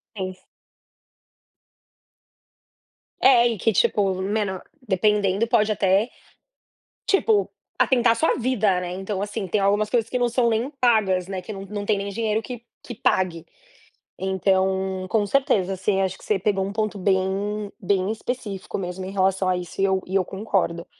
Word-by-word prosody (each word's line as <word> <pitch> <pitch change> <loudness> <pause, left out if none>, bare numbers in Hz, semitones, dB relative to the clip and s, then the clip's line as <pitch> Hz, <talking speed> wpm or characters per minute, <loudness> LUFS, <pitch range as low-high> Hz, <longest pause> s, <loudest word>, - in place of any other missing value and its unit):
Fez. 185 -2 -6 2.8
É 245 -2 +6
e 230 -2 -2
que 225 - +2
tipo, 195 0 +2
meno 195 -1 -1 0.3
dependendo 205 +1 +2
pode 220 -2 +2
até, 200 +2 +2 1.0
tipo, 410 +1 +2 0.3
atentar 245 -3 +4
a - - +2
sua 315 +8 +2
vida, 220 -7 +1
né, 180 -1 -5
então, 195 +1 -4
assim, 205 0 -4
tem 195 +4 0
algumas 205 +2 +2
coisas 230 -2 +1
que 250 - -1
não 245 0 +2
são 235 0 +2
nem 230 +4 0
pagas, 205 -7 +2
né, 190 -1 -4
que 180 - -8
não 195 - -7
não 205 0 -5
tem 210 -1 +2
nem 200 0 -3
dinheiro 220 +1 -1
que 240 0 -8 0.2
que 240 - -8
pague. 180 -6 0 0.8
Então, 190 0 0
com 215 0 +2
certeza, 210 - +1
assim, 190 +1 0
acho 190 -1 -1
que - - -16
você 210 - +1
pegou 195 0 0
um 200 - -5
ponto 215 -1 -2
bem 195 +2 -1
bem 195 +1 +1
específico 220 -4 -5
mesmo 185 0 -5
em 190 - -6
relação 190 -1 +1
a 180 - +1
isso 180 +2 -6
e - - +4
eu 190 -1 +1
e 190 - -4
eu 190 -2 +3
concordo. 190 -4 -2
200 Hz, 165 wpm, -23 LUFS, 190-220 Hz, 2.8 s, É